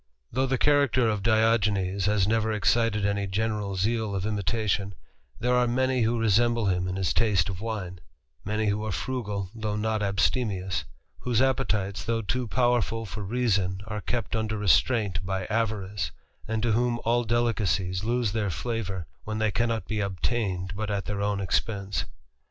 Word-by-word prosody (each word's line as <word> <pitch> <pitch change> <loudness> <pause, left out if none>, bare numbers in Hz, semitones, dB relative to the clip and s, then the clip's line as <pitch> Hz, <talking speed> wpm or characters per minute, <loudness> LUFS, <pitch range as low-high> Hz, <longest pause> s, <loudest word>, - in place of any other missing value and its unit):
Though 130 +3 +1
the 130 0 +1
character 140 -4 +3
of 105 -2 0
Diogenes 105 -3 +2
has 105 -2 +3
never 110 0 +1
excited 105 0 +2
any 100 -1 0
general 105 0 -1
zeal 110 +2 0
of 95 0 -2
imitation, 105 -1 -1 0.4
there 125 +1 +1
are 125 0 +3
many 130 +1 +1
who 115 +1 +2
resemble 115 +1 +3
him 90 -1 +1
in 90 - -3
his 95 -2 0
taste 105 -3 +2
of 95 0 -5
wine; 100 -6 -4 0.4
many 110 +2 -1
who 105 +1 0
are 110 - -2
frugal, 105 -5 -3
though 110 -2 -3
not 110 0 0
abstemious; 100 - 0 0.3
whose 120 -3 0
appetites, 105 -7 +1
though 115 +1 -1
too 125 +4 -1
powerful 120 -1 +1
for 105 +1 -6
reason, 100 -4 0
are 105 -1 -4
kept 120 0 -2
under 110 -1 -1
restraint 105 -1 +2
by 95 0 -2
avarice; 105 -5 -1 0.4
and 110 0 -1
to 120 - +2
whom 120 +1 +1
all 120 +1 +3
delicacies 105 -6 0
lose 120 -1 +1
their 105 -2 0
flavour, 95 -2 -3 0.2
when 110 0 -4
they 110 -1 +1
cannot 115 0 0
be 110 - -2
obtained 95 -1 -1
but 105 +1 -3
at 100 -1 -1
their 100 -1 -3
own 100 -1 0
expense. 100 +1 -1
105 Hz, 165 wpm, -27 LUFS, 100-115 Hz, 0.4 s, character